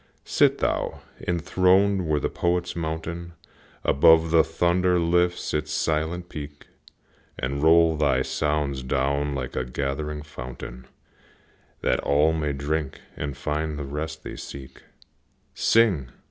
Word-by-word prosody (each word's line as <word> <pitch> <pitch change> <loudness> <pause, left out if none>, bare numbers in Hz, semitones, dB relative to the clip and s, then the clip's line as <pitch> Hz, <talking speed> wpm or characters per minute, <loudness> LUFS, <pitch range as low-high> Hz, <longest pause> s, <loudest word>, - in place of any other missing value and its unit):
Sit - - +3
thou - - -1 0.3
enthroned 95 +2 +2
where 75 -1 +2
the - - 0
Poet's 90 0 -1
mountain 85 +1 -4 0.5
Above 80 +3 +5
the 80 -1 +6
thunder 90 +3 +2
lifts 90 +1 +1
its 75 0 -1
silent 80 +3 -1
peak, 75 -3 -8 0.7
And 70 +3 -2
roll 80 +1 +5
thy 70 -4 +2
songs 75 -3 -1
down 70 +2 0
like 65 -2 -4
a 65 - 0
gathering 70 +4 -3
fountain, 60 -3 -9 0.9
That - - +1
all 75 +3 +3
may 75 -2 -1
drink 70 +1 -2 0.2
and 70 -2 -5
find 75 0 -2
the 75 - -4
rest 80 +3 -5
they - - -7
seek. 70 -2 -9 0.7
Sing! 95 - +3
75 Hz, 125 wpm, -25 LUFS, 70-85 Hz, 0.9 s, the